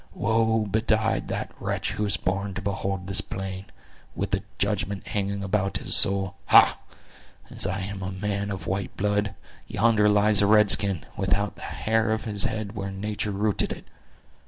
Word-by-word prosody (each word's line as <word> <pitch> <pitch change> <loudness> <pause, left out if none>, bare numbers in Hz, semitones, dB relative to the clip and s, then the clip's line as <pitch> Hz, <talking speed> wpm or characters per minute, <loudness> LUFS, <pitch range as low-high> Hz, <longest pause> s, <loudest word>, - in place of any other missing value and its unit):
Woe 110 0 +1
betide 110 +1 0
the - - -3
wretch - - -2
who 105 - -2
is 95 -1 +1
born 100 +1 -2
to 100 - -4
behold 95 -1 -3
this 95 +1 +2
plain, 95 -1 -6 0.5
with - - -3
the - - 0 0.2
judgment 100 -1 -2
hanging 100 -1 -2
about 100 0 0
his - - +3
soul! 95 -1 +4
Ha—as - - +1
I 95 +1 -2
am 100 +1 -5
a 95 +1 -4
man 100 +1 -3
of 95 -2 -5
white 95 +1 -3
blood, 105 0 0 0.3
yonder 105 -1 +3
lies 105 0 +4
a 100 - +3
red 105 -1 +5
skin, 95 -7 +1
without 100 +1 0
the - - -15
hair 110 0 -1
of 110 0 -1
his 105 -3 -1
head 110 -2 -3
where 100 -2 -5
nature 105 +2 -3
rooted 105 +1 -1
it! - - -7
100 Hz, 170 wpm, -25 LUFS, 95-105 Hz, 0.5 s, red